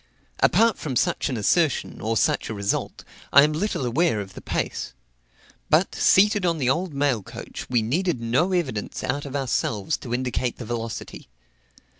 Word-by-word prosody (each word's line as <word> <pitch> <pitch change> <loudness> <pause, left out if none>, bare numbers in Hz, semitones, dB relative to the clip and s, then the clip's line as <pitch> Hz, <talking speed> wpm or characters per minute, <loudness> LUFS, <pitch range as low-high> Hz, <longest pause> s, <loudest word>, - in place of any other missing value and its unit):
Apart 230 -1 +3
from 140 -5 -4
such - - +1
an 130 - -2
assertion, 155 - +1
or 110 +1 0
such - - +1
a 110 - -4
result, 100 -1 -2 0.3
I 140 - +8
am 150 +1 +2
little 170 -3 -1
aware 130 0 +1
of 95 -2 -7
the - - -10
pace. - - -3 0.8
But, - - +3
seated 205 +1 +4
on 170 -2 +1
the 130 -4 +2
old 175 +4 -1
mail 140 -5 +1
coach, - - -9
we 120 -3 +2
needed 165 +5 0
no 125 +11 +1
evidence 140 - -2
out 145 +1 -2
of 140 - -7
ourselves 130 -2 -1
to 120 - -9
indicate 125 0 -1
the 120 - -7
velocity. 115 - -6
135 Hz, 170 wpm, -24 LUFS, 115-165 Hz, 0.8 s, I